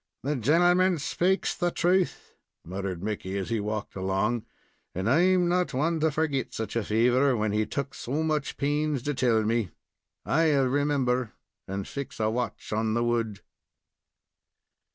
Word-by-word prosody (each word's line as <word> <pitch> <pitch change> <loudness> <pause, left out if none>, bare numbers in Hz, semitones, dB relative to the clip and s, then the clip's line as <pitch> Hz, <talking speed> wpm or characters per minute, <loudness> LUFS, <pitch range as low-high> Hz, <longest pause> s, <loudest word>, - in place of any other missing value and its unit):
"The 145 +3 0
gentleman 175 - +3
spakes 180 +6 0
the 175 -1 0
thruth," 180 +2 0 0.3
muttered 95 0 -4
Mickey, 100 -2 -3
as 95 +3 -4
he 115 - +1
walked 105 0 -4
along, 95 +5 -1 0.5
"and 95 +3 -2
I'm 180 +7 +4
not 180 +1 +2
the 130 - -5
one 160 +4 +1
to 160 +1 +3
forgit 145 -4 -1
such 110 0 -4
a 115 - +1
favor, 125 +5 +3
when 105 -1 0
he 105 +1 0
took 140 -1 -3
so 145 +6 -2
much 155 -2 -1
pains 145 -2 0
to 145 - -1
tell 120 -4 +2
me. 110 -2 0 0.6
I'll 150 -3 +3
remember 130 -3 0 0.3
and 95 0 -4
fix 140 -4 -6
a 110 0 +1
watch 125 +1 -4
in 110 +1 0
the 120 - +1
wood." 115 -3 -1
125 Hz, 155 wpm, -27 LUFS, 110-155 Hz, 0.6 s, I'm